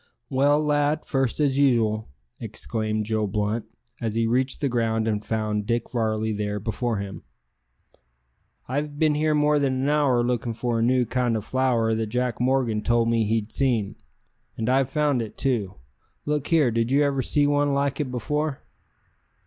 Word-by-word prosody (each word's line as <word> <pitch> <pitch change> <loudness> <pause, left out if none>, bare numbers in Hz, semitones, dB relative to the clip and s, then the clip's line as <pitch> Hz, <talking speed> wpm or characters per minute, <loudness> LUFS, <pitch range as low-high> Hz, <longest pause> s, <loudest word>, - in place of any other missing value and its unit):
"Well, 145 +3 +3
lad, 150 0 +1
first 135 -2 -1
as 140 -2 +2
usual," 110 -6 +2 0.3
exclaimed 110 -1 -3
Joe 110 -1 0
Blunt, 105 +3 -1 0.4
as 110 -2 -2
he 115 0 +2
reached 130 +3 0
the 140 - 0
ground 115 -3 0
and 105 -1 -1
found 105 -2 -2
Dick 120 0 -1
Varley 110 -2 0
there 105 0 -2
before 115 +2 -2
him. 100 0 -6 1.5
"I've 145 +3 -3
bin 155 0 +3
here 155 +1 +1
more 150 0 +3
than 130 -2 0
an 140 - +1
hour 140 -5 +3
lookin' 120 -1 -1
for 120 -1 -1
a - - +1
new 125 +1 +3
kind 120 -2 0
o' - - -3
flower 120 -1 +1
that 110 0 -1
Jack 125 +1 -2
Morgan 125 -4 +1
told 115 0 +2
me 115 -1 +2
he'd 110 0 -1
seen. 120 -7 0 0.6
And 110 +1 -1
I've 130 0 +2
found 145 -4 +1
it 110 - -7
too. 115 -8 -1 0.5
Look 150 -1 -1
here; 155 -7 +3
did 115 +1 0
you 145 +2 +4
ever 140 -2 +1
see 145 +3 +1
one 145 -1 +2
like 140 0 0
it 145 -3 -1
before?" 150 +3 -2
125 Hz, 175 wpm, -24 LUFS, 110-140 Hz, 1.5 s, you